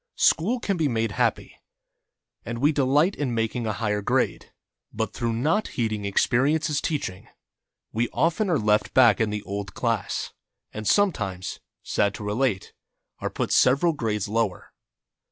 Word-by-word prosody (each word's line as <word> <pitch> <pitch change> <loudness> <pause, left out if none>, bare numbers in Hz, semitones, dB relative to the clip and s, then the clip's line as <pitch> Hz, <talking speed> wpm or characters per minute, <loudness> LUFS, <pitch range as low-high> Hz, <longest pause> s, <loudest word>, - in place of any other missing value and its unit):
School 225 +10 +3
can 200 -5 -1
be 160 -3 +1
made 115 -4 0
happy - - -1 0.9
and 115 +1 -5
we 145 +6 +3
delight 145 +6 +2
in 130 -5 -2
making 115 +1 -1
a 110 - 0
higher 105 -1 -1
grade - - -1 0.2
— - - -62
but - - -3
through 115 -1 -2
not 155 - +1
heeding 110 -4 -1
Experience's 145 +9 +1
teaching 135 - -3 0.6
we 115 +2 -1
often 170 +5 +1
are 165 - +3
left 105 -2 +1
back 115 -5 +6
in 110 - +2
the 105 0 -4
old 100 -1 -5
class, 115 -4 -2 0.4
and 110 -1 -5
sometimes, 100 - 0 0.2
sad 100 0 0
to - - -7
relate, 105 -1 -1 0.5
are - - -2
put - - -2
several 140 +7 +4
grades 110 -7 -2
lower. 105 -4 -2
115 Hz, 155 wpm, -25 LUFS, 105-150 Hz, 0.9 s, back